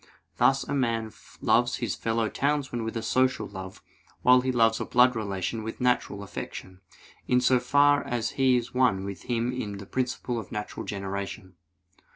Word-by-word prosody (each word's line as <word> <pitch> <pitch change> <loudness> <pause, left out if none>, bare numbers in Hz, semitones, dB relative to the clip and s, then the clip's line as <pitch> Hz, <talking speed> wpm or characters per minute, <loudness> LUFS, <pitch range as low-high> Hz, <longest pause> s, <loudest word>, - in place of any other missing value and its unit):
Thus 135 0 +3
a - - -4
man 115 -5 -1 0.3
loves - - +3
his - - -2
fellow 115 0 -1
townsman 140 -3 -1
with 115 +1 -3
a 115 - -4
social 130 +3 +1
love, 95 -1 -9 0.4
while 125 0 +6
he 130 +1 0
loves 115 -2 +3
a - - -2
blood 125 +1 +4
relation 100 0 -3
with 110 +1 -6
natural 125 -5 0
affection, 95 -1 -8 0.5
in 125 - +4
so 125 0 +3
far 145 +3 +4
as 115 -2 -2
he 130 -2 +3
is 120 0 -4
one 125 -7 +2
with 100 -1 -7
him 120 0 0
in 105 -5 -4
the 100 - -9
principle 125 0 -2
of 105 - -9
natural 105 0 -5
generation. 100 -1 -5
115 Hz, 175 wpm, -27 LUFS, 100-125 Hz, 0.5 s, while